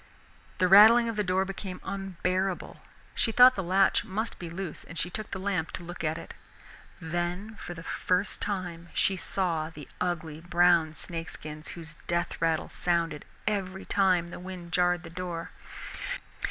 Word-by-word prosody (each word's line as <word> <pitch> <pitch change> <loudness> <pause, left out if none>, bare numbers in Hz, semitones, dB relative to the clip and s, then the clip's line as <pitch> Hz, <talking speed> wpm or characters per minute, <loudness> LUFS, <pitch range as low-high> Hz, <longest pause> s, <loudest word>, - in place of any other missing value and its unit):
The 185 - +3
rattling 220 +5 +9
of 225 - -3
the 210 - +1
door 185 0 +1
became 190 -1 -6
unbearable, 190 -1 -2 0.4
she 225 - +2
thought 250 +3 +8
the 195 - -2
latch 190 +2 +3
must 220 +1 -3
be 175 - -6
loose 170 -1 -5
and 165 - -10
took 195 +6 -3
the - - -4
lamp 190 -4 -1
to 180 - -5
look 175 +1 -7
at 155 0 0
it. - - -9 0.7
Then 175 +5 -3
for 175 - -7
the 165 - -8
first 185 +3 0
time 175 -4 -3
she 195 - +3
saw 170 -4 -1
the 155 -3 -10
ugly 165 -4 -2
brown 175 -2 +4
snake 165 -1 -5
skins 155 0 -8
whose 160 -2 -9
death 170 0 -1
rattle 165 -1 +1
sounded 170 -3 0 0.2
every 195 -2 -2
time 185 -4 +3
the - - -8
wind 180 -1 -8
jarred 175 0 +2
the 165 - -9
door. 175 -1 -5
180 Hz, 165 wpm, -29 LUFS, 170-195 Hz, 0.7 s, rattling